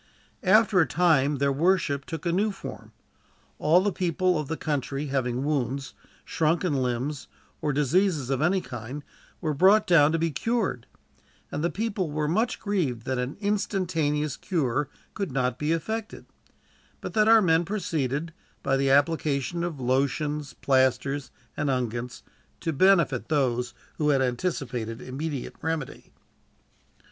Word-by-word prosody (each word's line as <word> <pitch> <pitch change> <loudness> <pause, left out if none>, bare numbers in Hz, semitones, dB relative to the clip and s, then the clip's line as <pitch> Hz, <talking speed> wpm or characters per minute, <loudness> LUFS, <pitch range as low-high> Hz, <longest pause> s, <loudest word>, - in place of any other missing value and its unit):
After 205 -2 +5
a 160 - +2
time, 150 -1 +3
their 140 0 +1
worship 145 -2 +1
took 165 -1 -6
a 170 - +1
new 200 +5 +2
form. 110 - -9 0.7
All 165 +4 +4
the 205 +1 +1
people 180 -1 +1
of 150 - -4
the 160 - -3
country 145 -1 -2
having 125 -1 0
wounds, 140 -2 -2 0.3
shrunken 165 +1 +1
limbs, 130 +2 -2 0.3
or 150 - 0
diseases 150 0 +1
of 135 0 0
any 180 +4 +2
kind 125 +3 -7 0.4
were 155 -4 0
brought 195 +8 +5
down 155 -4 +5
to 165 - +1
be 165 0 0
cured; 205 - -1 0.6
and 150 - -3
the 170 - +2
people 200 -5 -2
were 150 0 -1
much 220 +10 0
grieved 160 - -1
that 130 -1 -1
an 125 +3 -3
instantaneous 165 -8 0
cure 145 - -1 0.2
could 195 -8 -3
not 125 -1 -1
be 150 +1 0
effected, 220 +7 -3 0.7
but - - -6
that 215 -1 +3
our 225 0 +8
men 165 -4 +3
proceeded, 165 -5 -2 0.3
by 135 -1 +2
the 135 0 +1
application 145 +2 +1
of 170 -5 -4
lotions, 140 +3 0
plasters, 135 +1 +1 0.3
and 150 - -1
unguents, 120 -2 -2 0.4
to 165 - -2
benefit 170 - +3
those 125 -5 0 0.2
who 150 -1 +2
had 135 -2 +3
anticipated 125 -4 -2
immediate 135 +2 -5
remedy. 160 -4 -4
150 Hz, 145 wpm, -26 LUFS, 135-175 Hz, 0.7 s, our